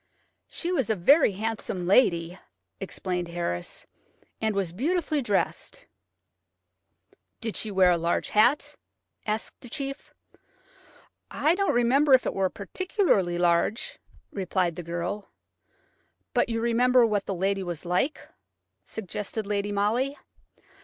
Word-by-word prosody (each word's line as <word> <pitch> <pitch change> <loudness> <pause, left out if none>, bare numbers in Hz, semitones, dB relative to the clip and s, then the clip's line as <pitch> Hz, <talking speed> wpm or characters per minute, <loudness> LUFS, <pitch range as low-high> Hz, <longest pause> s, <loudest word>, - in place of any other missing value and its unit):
"She 350 - -4
was 270 - 0
a 220 - +2
very 270 - +5
handsome 205 -3 -3
lady," 180 -4 +3 0.4
explained 180 -2 -3
Harris, 170 - -4 0.6
"and 220 -2 0
was 190 -4 -1
beautifully 310 - 0
dressed." 210 -6 -2 1.5
"Did 225 -2 -4
she 220 - -2
wear 190 -2 +4
a 170 - +2
large 170 +1 0
hat?" 240 +7 +3 0.5
asked 215 +1 -3
the 245 - -11
chief. 275 +2 -5 1.2
"I 310 - +2
don't 395 -4 +1
remember 265 +4 +4
if 255 - +1
it - - -1
was 190 -1 +1
particularly 200 - 0
large," 175 - +1 0.3
replied 185 -2 -1
the 175 - -6
girl. 175 +4 -4 1.0
"But - - +2
you 225 -1 -1
remember 245 +1 +4
what 210 -3 -1
the 195 - -2
lady 195 +2 0
was 175 -3 -5
like?" 180 - -1 0.6
suggested 210 +1 -5
Lady 205 0 -1
Molly. 230 +8 0
205 Hz, 125 wpm, -27 LUFS, 180-250 Hz, 1.5 s, very